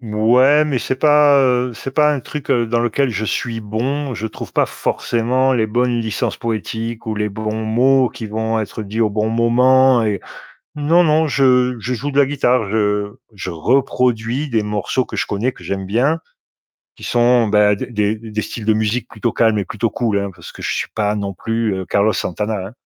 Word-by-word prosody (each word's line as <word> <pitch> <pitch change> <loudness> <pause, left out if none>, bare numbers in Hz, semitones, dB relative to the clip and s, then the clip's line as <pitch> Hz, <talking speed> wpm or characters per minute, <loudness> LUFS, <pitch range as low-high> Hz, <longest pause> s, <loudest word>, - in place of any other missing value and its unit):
Mouais, 125 +7 +3
mais 140 -4 -1
c'est 130 - -2
pas, 150 -1 +5
heu, 125 -1 +1
c'est 135 +4 -7
pas 150 +1 +3
un 145 - -1
truc 145 +3 -7
dans 120 -1 +1
lequel 120 +3 0
je 110 -1 -3
suis 115 +1 -3
bon. 125 +6 -3
Je 110 - -4
trouve 110 - -9
pas - - +2
forcément 125 +3 0
les 115 -4 +1
bonnes 120 +1 0
licences 110 -2 -2
poétiques 115 -1 -4
ou 110 - -2
les 105 0 -1
bons 110 +1 -4
mots 130 +4 +3
qui 115 0 -8
vont 110 +1 -2
être 110 +1 -4
dits 105 +2 -4
au 110 -2 +2
bon 105 +1 -1
moment 125 +2 +4
et 105 -3 -1 0.6
non, 160 +4 +3
non, 160 0 +3
je 125 -2 +3
je 125 +3 -3
joue 125 +4 -3
de 140 - +2
la 140 - +5
guitare. 125 -5 +1
Je 105 -1 0 0.2
je 95 -2 -6
reproduis 125 - 0
des 110 -3 0
morceaux 105 +5 -1
que - - -8
je - - -1
connais, 105 +6 -1
que - - -16
j'aime 95 -1 -4
bien, 130 +11 +1 0.8
qui - - -16
sont, 120 -1 +3
bah, 105 0 +4
des 100 - -5
des 105 -3 0
d 110 0 -11
des 110 0 -2
styles 110 - -7
de 110 - +4
musique 110 +2 -1
plutôt 115 +1 -3
calmes 110 -2 +2
et 100 - -1
plutôt 110 +5 -2
cools, 110 -1 -1
hein, 100 0 -3
parce - - -12
que - - -13
je - - -2
suis - - -2
pas 105 -1 0
non 100 -1 -3
plus, 115 +2 -2
heu, 95 -1 -5
Carlos 105 +2 +2
Santana, 105 +3 -2
hein. - - -14
115 Hz, 210 wpm, -18 LUFS, 105-130 Hz, 0.8 s, pas